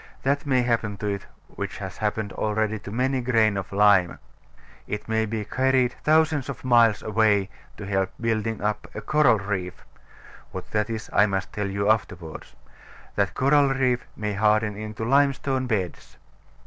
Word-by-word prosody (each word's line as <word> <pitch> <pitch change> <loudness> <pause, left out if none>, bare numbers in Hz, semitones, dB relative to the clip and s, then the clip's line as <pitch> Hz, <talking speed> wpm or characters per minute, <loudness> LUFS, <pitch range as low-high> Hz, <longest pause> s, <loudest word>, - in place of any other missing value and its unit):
That 140 +2 0
may 130 -2 +3
happen 115 -4 -1
to 105 - -6
it, 100 -1 -3 0.2
which - - -6
has - - -7
happened 105 -1 -2
already 110 0 -1
to 100 - -9
many 130 +4 0
a - - -2
grain 115 -4 +2
of 95 -2 -4
lime. 100 -3 +4 0.7
It 105 0 -5
may 110 0 0
be 110 -1 -3
carried 130 +1 +1
thousands 155 -3 +2
of 130 -2 -7
miles 115 -4 +4
away 105 -3 +2 0.3
to 105 - -7
help 95 -1 0
in - - -13
building 110 -1 -1
up 105 0 -1
a - - -4
coral 150 -7 +3
reef 95 -3 -4 0.7
(what - - -8
that 105 0 0
is 110 -2 -4
I 100 - +5
must 95 -1 -3
tell 105 -1 -2
you 100 +1 -1
afterwards). 90 -7 -4 0.6
That 100 -1 0
coral 140 +1 +4
reef 130 -2 0
may 105 -1 -3
harden 105 +1 +2
into 110 +1 -5
limestone 135 0 +2
beds. 95 -7 -3
110 Hz, 170 wpm, -25 LUFS, 105-125 Hz, 0.7 s, I